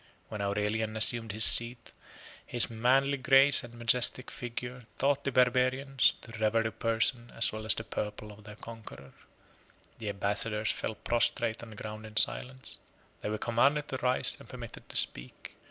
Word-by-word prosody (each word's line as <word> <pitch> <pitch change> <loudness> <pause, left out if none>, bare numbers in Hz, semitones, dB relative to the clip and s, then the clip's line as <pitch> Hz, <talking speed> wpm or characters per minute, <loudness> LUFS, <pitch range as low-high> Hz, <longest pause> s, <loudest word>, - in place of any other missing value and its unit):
When 105 -2 -6
Aurelian 105 +2 -2
assumed 115 0 +2
his 110 +2 +5
seat, 115 0 +4 0.5
his 120 -1 +1
manly 135 +5 +2
grace 135 +2 +5
and 120 0 -12
majestic 120 +2 +2
figure 125 +1 -7
30 115 - -19
taught 140 +1 0
the 140 - -2
barbarians 130 +1 +2
to 115 -2 -10
revere 110 +1 +1
the 110 - -3
person 115 +2 -1
as 115 - +2
well 110 0 -7
as 110 - +5
the 110 - -5
purple 105 0 -6
of 105 +1 -15
their 105 0 -11
conqueror. 110 - -12 0.9
The 110 -2 -5
ambassadors 105 +2 -1
fell 110 - -4
prostrate 115 -1 0
on 120 - -10
the 110 - -12
ground 110 +1 -8
in 110 0 -9
silence. 130 +1 0 0.4
They - - -4
were 110 - -2
commanded 140 +7 +1
to 130 - -3
rise, 125 0 +2
and - - -15
permitted - - -10
to - - -2
speak. - - -4
115 Hz, 170 wpm, -29 LUFS, 110-125 Hz, 0.9 s, his